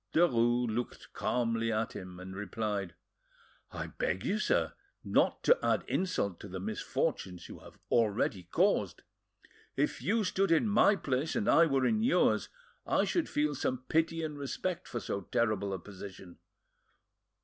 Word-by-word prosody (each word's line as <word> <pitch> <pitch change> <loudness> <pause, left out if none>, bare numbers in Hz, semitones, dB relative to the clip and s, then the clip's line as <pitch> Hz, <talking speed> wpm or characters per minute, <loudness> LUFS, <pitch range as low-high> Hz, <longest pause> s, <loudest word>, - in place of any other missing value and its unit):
Derues 120 -7 +3
looked 120 +2 -4
calmly 115 -2 0
at 110 0 -1
him, 90 -1 -8
and 95 +1 -8
replied— 105 -3 -3 0.8
"I - - -4
beg 95 +1 -2
you, 215 - 0
sir, - - +1 0.3
not - - +2
to - - +5
add - - +2
insult 140 - -1
to - - -8
the 95 -1 -6
misfortunes 95 -2 -2
you - - -10
have - - -15
already 105 -3 +2
caused. 90 - +1 0.7
If 145 +2 0
you 220 +3 +1
stood 195 -1 +1
in 165 +7 +4
my 210 0 +5
place 140 -3 -1
and 220 -3 0
I 165 -3 +6
were 135 -3 +2
in 220 -1 +2
yours, 245 +5 +3 0.3
I - - +2
should 345 - 0
feel 150 0 +1
some 130 -2 -2
pity 165 +1 +1
and 150 -2 -4
respect 170 +5 -3
for 120 - -4
so 100 - -3
terrible 105 0 0
a 95 - -2
position. 95 -1 -11
120 Hz, 155 wpm, -31 LUFS, 100-165 Hz, 0.8 s, I